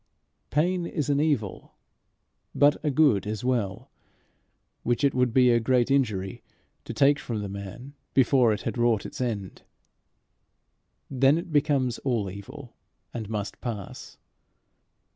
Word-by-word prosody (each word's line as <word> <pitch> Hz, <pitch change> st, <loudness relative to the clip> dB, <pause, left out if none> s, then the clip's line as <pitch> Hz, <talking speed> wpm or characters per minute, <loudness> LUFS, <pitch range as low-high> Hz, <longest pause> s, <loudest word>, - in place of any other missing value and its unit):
Pain 175 Hz, +4 st, 0 dB
is 150 Hz, -4 st, -2 dB
an 140 Hz, -, +2 dB
evil; 140 Hz, -11 st, -1 dB, 0.8 s
but 145 Hz, 0 st, +5 dB
a 150 Hz, -, +1 dB
good 135 Hz, -9 st, +3 dB
as 110 Hz, +2 st, -4 dB
well, 115 Hz, -7 st, -2 dB, 0.9 s
which 120 Hz, +3 st, -1 dB
it 140 Hz, -, +3 dB
would 125 Hz, -1 st, +1 dB
be 125 Hz, 0 st, +5 dB
a 120 Hz, -, +4 dB
great 125 Hz, +2 st, +1 dB
injury 105 Hz, -9 st, 0 dB, 0.4 s
to -, -, -6 dB
take 140 Hz, +3 st, +4 dB
from 110 Hz, -3 st, -4 dB
the -, -, -4 dB
man 100 Hz, +7 st, -8 dB, 0.2 s
before 130 Hz, -2 st, +4 dB
it 105 Hz, -, -2 dB
had -, -, -3 dB
wrought 120 Hz, -3 st, +2 dB
its -, -, -7 dB
end. 105 Hz, -6 st, -4 dB, 1.5 s
Then 135 Hz, +3 st, +4 dB
it 170 Hz, 0 st, -6 dB
becomes 140 Hz, -5 st, +1 dB
all 115 Hz, -8 st, -1 dB
evil, 110 Hz, +6 st, -10 dB, 0.4 s
and 110 Hz, -4 st, -5 dB
must 105 Hz, -2 st, -4 dB
pass. 110 Hz, -6 st, -7 dB
125 Hz, 140 wpm, -26 LUFS, 105-140 Hz, 1.5 s, but